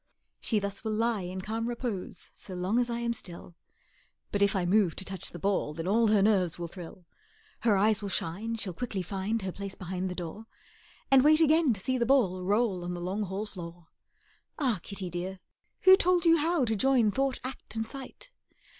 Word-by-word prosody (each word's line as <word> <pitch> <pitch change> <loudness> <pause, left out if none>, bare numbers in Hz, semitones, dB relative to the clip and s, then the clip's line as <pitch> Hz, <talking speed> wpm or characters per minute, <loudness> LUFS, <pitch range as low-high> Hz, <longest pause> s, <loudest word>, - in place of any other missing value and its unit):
She 225 - 0
thus 200 0 -3
will 220 -1 -1
lie 225 -1 +1
in 185 +1 -5
calm 225 +3 -3
repose 235 -5 -3
So 185 - -8
long 185 +6 +1
as 245 -1 +1
I 235 - -1
am 235 0 0
still; 175 -5 -8 0.8
But 205 - -1
if 200 0 +3
I 185 -2 +1
move 190 -2 +3
to 190 - -3
touch 190 -1 -3
the - - -9
ball, 185 -4 -1
Then 165 +2 -4
all 225 +3 +3
her 210 -2 +4
nerves 190 -6 +2
will 170 -1 -4
thrill, 175 0 -10 0.5
Her 215 -4 +3
eyes 210 +1 +3
will 200 - -4
shine, 195 +6 -1
she'll 210 -5 -3
quickly 205 -2 -3
find 195 +4 -2
Her 190 - -2
place 195 +1 -6
behind 185 0 -4
the 180 - -5
door, 180 +6 -7 0.6
And 265 -1 +7
wait 310 +1 +6
again 315 -2 +4
to 200 - -4
see 255 +6 -1
the 235 - +1
ball 215 -9 +3
Roll 200 -1 +1
on 175 0 -3
the - - -5
long 185 +4 -2
hall 195 +3 -4
floor. 170 -4 -10 0.7
Ah, 255 - +1
kitty 195 -2 -5
dear, 180 +2 -4 0.4
who 375 0 +9
told 360 -2 +2
you 330 0 +6
how 320 -2 +2
To 220 -1 0
join 245 -1 +3
thought, 270 +2 0
act, 255 -3 -6
and 225 0 -1
sight? 275 - -9
205 Hz, 210 wpm, -29 LUFS, 185-235 Hz, 0.8 s, who